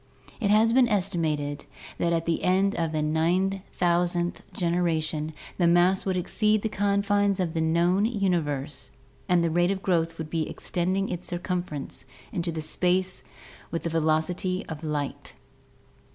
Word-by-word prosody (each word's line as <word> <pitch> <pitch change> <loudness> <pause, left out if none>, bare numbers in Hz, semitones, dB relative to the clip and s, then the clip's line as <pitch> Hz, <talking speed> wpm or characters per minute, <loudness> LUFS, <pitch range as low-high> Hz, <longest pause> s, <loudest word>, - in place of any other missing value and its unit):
It 210 -4 0
has 220 +2 +5
been 255 -1 +5
estimated 155 -7 -1 0.3
that 170 - +1
at 165 -1 0
the 165 -1 0
end 190 +2 +3
of 165 -2 -1
the 155 -1 0
9000th 175 +1 +1
generation 165 -3 0 0.3
the 175 - +4
mass 175 +2 +4
would 190 -2 0
exceed 215 +4 +1
the 220 - 0
confines 200 0 +1
of 175 -3 -1
the 165 - 0
known 170 +5 +2
universe 170 - -1 0.4
and 175 -1 +4
the 165 - +1
rate 175 +2 +3
of 195 -1 -2
growth 165 -3 +1
would 160 -1 -6
be 160 -2 -1
extending 185 +2 -1
its 180 0 -5
circumference 175 -7 -4 0.3
into 170 -2 -2
space 180 +3 0 0.5
with 165 - -3
the 170 - -2
velocity 165 +4 0
of 160 -1 -7
light! 150 -2 -4
175 Hz, 145 wpm, -26 LUFS, 160-190 Hz, 0.5 s, has